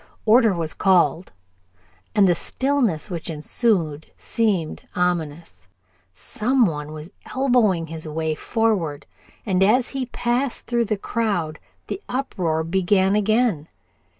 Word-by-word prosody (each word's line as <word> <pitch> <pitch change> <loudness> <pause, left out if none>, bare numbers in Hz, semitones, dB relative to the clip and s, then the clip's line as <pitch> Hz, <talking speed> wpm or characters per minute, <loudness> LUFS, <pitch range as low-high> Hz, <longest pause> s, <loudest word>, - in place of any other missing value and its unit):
Order 225 -2 +5
was 160 -4 -2
called, 175 -1 +2 0.8
and 200 -2 +5
the 175 - +4
stillness 235 - 0
which 170 -1 -3
ensued 160 -1 -1
seemed 200 -9 -1
ominous. 160 - -2 0.4
Some 240 - +1
one 150 -4 -3
was 155 +3 -9 0.2
elbowing 240 -10 +2
his 160 0 -6
way 160 0 -2
forward, 185 -7 -1 0.4
and 190 -3 +1
as 235 +6 +3
he 265 -2 -3
passed 245 +2 -1
through 235 -1 0
the 215 0 -1
crowd 200 -8 -2 0.3
the 390 - -5
uproar 180 -11 -1
began 190 +3 +2
again. 210 -6 +1
190 Hz, 120 wpm, -22 LUFS, 160-230 Hz, 0.8 s, Order